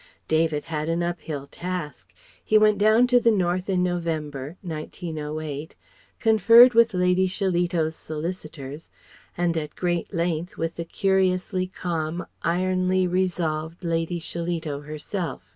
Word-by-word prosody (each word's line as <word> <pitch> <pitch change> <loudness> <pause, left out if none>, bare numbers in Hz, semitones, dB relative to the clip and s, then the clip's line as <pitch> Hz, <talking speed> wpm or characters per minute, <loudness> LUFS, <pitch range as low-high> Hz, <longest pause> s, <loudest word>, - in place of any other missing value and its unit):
David 160 -2 +1
had 155 0 -3
an 170 +1 0
uphill 160 -5 -4
task. 175 0 -6 0.3
He 215 - +4
went 215 -1 +4
down 215 +4 +5
to 250 0 +4
the 235 - +3
North 185 -2 0
in 180 -2 +2
November, 160 -4 -3
1908, 155 -2 -5 0.4
conferred 230 +2 +7
with 230 -3 +4
Lady 180 +1 +3
Shillito's 175 -4 0
solicitors, 155 -2 -6 0.5
and 175 -1 +1
at 150 -2 -4
great 175 -1 -1
length 170 -1 -2
with 165 0 -3
the 170 - -3
curiously 185 0 +1
calm, 170 -2 -3 0.2
ironly 185 +1 +1
resolved 175 -2 -1
Lady 165 0 -1
Shillito 165 -3 -4
herself. 155 - -5
175 Hz, 125 wpm, -25 LUFS, 155-185 Hz, 0.5 s, conferred